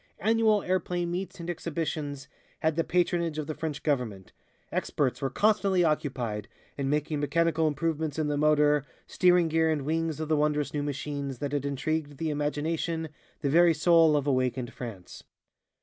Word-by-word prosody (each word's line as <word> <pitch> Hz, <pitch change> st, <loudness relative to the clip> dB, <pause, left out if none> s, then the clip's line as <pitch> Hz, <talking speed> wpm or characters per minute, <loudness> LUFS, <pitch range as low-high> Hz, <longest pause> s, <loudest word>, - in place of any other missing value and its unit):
Annual 220 Hz, -1 st, +3 dB
airplane 175 Hz, -1 st, -1 dB
meets 185 Hz, +1 st, -4 dB
and 170 Hz, -, -6 dB
exhibitions 155 Hz, -4 st, -3 dB, 0.3 s
had 160 Hz, -1 st, +1 dB
the 165 Hz, -, +1 dB
patronage 170 Hz, -2 st, 0 dB
of 155 Hz, -, -2 dB
the 155 Hz, -, -4 dB
French 150 Hz, -2 st, -5 dB
Government. 120 Hz, -10 st, -2 dB, 0.4 s
Experts 130 Hz, -4 st, -1 dB
were 135 Hz, -, 0 dB
constantly 195 Hz, -, +2 dB
occupied 125 Hz, -, -1 dB, 0.3 s
in 135 Hz, -1 st, -2 dB
making 150 Hz, +1 st, 0 dB
mechanical 160 Hz, +2 st, +1 dB
improvements 155 Hz, 0 st, -1 dB
in 155 Hz, -, 0 dB
the 150 Hz, 0 st, 0 dB
motor, 150 Hz, 0 st, +3 dB, 0.2 s
steering 180 Hz, -2 st, +3 dB
gear 160 Hz, 0 st, +2 dB
and 155 Hz, -3 st, 0 dB
wings 160 Hz, +1 st, -1 dB
of 155 Hz, -, -3 dB
the 155 Hz, -, +2 dB
wondrous 150 Hz, -1 st, 0 dB
new 145 Hz, -, -1 dB
machines 140 Hz, -1 st, -4 dB
that 140 Hz, +2 st, -3 dB
had 145 Hz, -1 st, -1 dB
intrigued 145 Hz, +1 st, -2 dB
the 160 Hz, +1 st, -1 dB
imagination, 160 Hz, +2 st, -2 dB, 0.3 s
the 140 Hz, -, 0 dB
very 170 Hz, +1 st, +5 dB
soul 165 Hz, -1 st, +5 dB
of 145 Hz, -, -1 dB
awakened 130 Hz, -2 st, 0 dB
France. 110 Hz, -8 st, -8 dB
150 Hz, 165 wpm, -28 LUFS, 145-165 Hz, 0.4 s, very